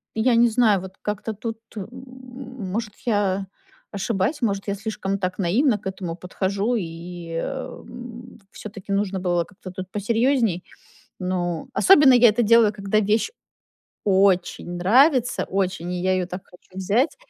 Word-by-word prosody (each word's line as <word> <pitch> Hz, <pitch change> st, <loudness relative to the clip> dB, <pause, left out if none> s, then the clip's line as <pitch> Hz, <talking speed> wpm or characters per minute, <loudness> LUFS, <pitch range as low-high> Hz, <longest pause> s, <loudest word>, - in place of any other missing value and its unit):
я 235 Hz, +2 st, +3 dB
не 235 Hz, +1 st, +6 dB
знаю, 220 Hz, -4 st, +3 dB
вот 190 Hz, 0 st, -9 dB
как-то 210 Hz, +1 st, -3 dB
тут, 225 Hz, +2 st, -5 dB, 0.2 s
м. 200 Hz, -2 st, -5 dB, 0.9 s
Может, 215 Hz, -2 st, -3 dB
я 200 Hz, -3 st, +1 dB, 0.4 s
ошибаюсь, 205 Hz, +8 st, -1 dB
может, 200 Hz, -3 st, -1 dB
я 200 Hz, -, -1 dB
слишком 200 Hz, -1 st, -3 dB
так 185 Hz, +1 st, -3 dB
наивно 215 Hz, -, +2 dB
к 190 Hz, -, -8 dB
этому 185 Hz, -3 st, -4 dB
подхожу 195 Hz, +5 st, -1 dB
и, 170 Hz, -1 st, -7 dB
м, 245 Hz, 0 st, -7 dB
всё-таки 200 Hz, -2 st, -9 dB
нужно 195 Hz, -1 st, 0 dB
было 175 Hz, -2 st, 0 dB
как-то 185 Hz, -2 st, -11 dB
тут 185 Hz, 0 st, -7 dB
посерьезней. 225 Hz, -2 st, +1 dB, 0.6 s
Ну, 175 Hz, -2 st, -2 dB
особенно 295 Hz, -9 st, +7 dB
я 245 Hz, -2 st, +7 dB
это 230 Hz, +3 st, +1 dB
делаю, 220 Hz, -1 st, +5 dB
когда 200 Hz, +1 st, 0 dB
вещь 215 Hz, -, +1 dB, 0.8 s
очень 190 Hz, -3 st, +2 dB
нравится. 245 Hz, -, +3 dB
Очень. 180 Hz, -2 st, -2 dB
И 180 Hz, -, -2 dB
я 185 Hz, 0 st, +2 dB
ее 185 Hz, -1 st, 0 dB
так 180 Hz, +1 st, -7 dB
хочу 180 Hz, -, -21 dB
взять. 230 Hz, -, +1 dB
200 Hz, 145 wpm, -23 LUFS, 185-230 Hz, 0.9 s, особенно